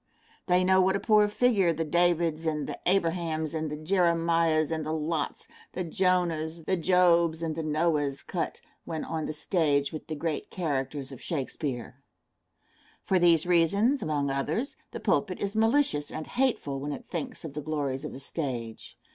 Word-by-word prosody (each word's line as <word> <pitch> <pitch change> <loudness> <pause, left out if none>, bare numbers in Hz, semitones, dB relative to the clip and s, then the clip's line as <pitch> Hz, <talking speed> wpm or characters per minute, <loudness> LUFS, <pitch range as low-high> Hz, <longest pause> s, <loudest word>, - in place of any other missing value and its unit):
They 180 0 +4
know 190 +1 +5
what 190 +1 +3
a - - 0
poor 210 -1 +4
figure 205 -5 +3
the 165 0 -1
Davids 165 -1 +1
and 150 -2 -1
the - - -6
Abrahams 165 -4 0
and 160 -1 -2
the 150 - -4
Jeremiahs 165 -2 +2
and 160 -1 -1
the 155 - -3
Lots, 155 -1 -2 0.3
the 185 - -2
Jonahs, 170 -3 0
the 190 - +2
Jobs 170 -2 +3
and 160 -1 -2
the 165 - -2
Noahs 150 -3 0
cut - - -3 0.2
when 160 -2 -4
on 160 -1 -3
the - - -2
stage 150 -3 +1
with 155 - -7
the 155 - -4
great 155 0 -3
characters 140 -5 -3
of 130 - -10
Shakespeare. 135 -4 -4 1.0
For 190 - +3
these 170 -2 +4
reasons, 200 - +3
among 145 -3 -1
others, 155 - -2
the - - -7
pulpit 190 -4 0
is 200 +1 -3
malicious 225 - +2
and 155 - -5
hateful 240 - 0
when 145 +2 -3
it - - -8
thinks 250 -9 -5
of 150 - -7
the 150 - -4
glories 140 -3 -2
of 150 - -5
the - - -8
stage. 125 -6 -5
165 Hz, 170 wpm, -28 LUFS, 150-180 Hz, 1.0 s, know